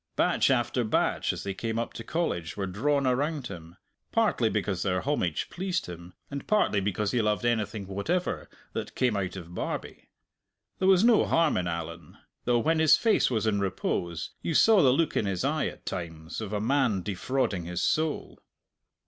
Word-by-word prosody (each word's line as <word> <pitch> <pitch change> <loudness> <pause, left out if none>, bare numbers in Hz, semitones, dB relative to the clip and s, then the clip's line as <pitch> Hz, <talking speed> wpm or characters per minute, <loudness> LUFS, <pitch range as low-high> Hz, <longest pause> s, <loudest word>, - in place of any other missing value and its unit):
Batch - - +3
after - - +1
batch - - +1
as - - -6
they 100 - -3
came 115 +3 -3
up 115 - -2
to 115 - -7
College 100 - -2
were 100 - -1
drawn 135 +10 0
around 140 +3 0
him 85 -3 -9 0.4
partly 210 - +2
because 100 -4 -1
their 90 -2 0
homage 130 - -1
pleased 185 0 -2
him, 90 0 -10 0.2
and 140 -1 -5
partly 210 - +3
because 100 +1 -1
he 120 - +2
loved 105 +2 0
anything 110 -3 0
whatever 100 - -2 0.2
that - - -5
came 125 -4 +1
out 95 -2 -2
of 85 -2 -9
Barbie. - - -5 0.7
There 190 - +2
was 190 0 +6
no 235 -2 +5
harm 165 -2 +3
in 90 - 0
Allan 85 -1 -6 0.3
though 120 0 +3
when 160 +7 +2
his 160 -1 +6
face 225 -2 +3
was 115 -3 0
in 105 -2 +1
repose 85 -3 -2
you 165 - -2
saw 220 +2 +6
the 135 - +5
look 155 +4 +1
in 105 - +1
his 95 -3 -1
eye - - +1
at - - -9
times 80 +2 -5
of 105 -2 -5
a 105 - -1
man 115 -4 +1
defrauding 100 -1 -1
his 90 0 -3
soul. 155 -1 -1
110 Hz, 185 wpm, -28 LUFS, 90-145 Hz, 0.7 s, was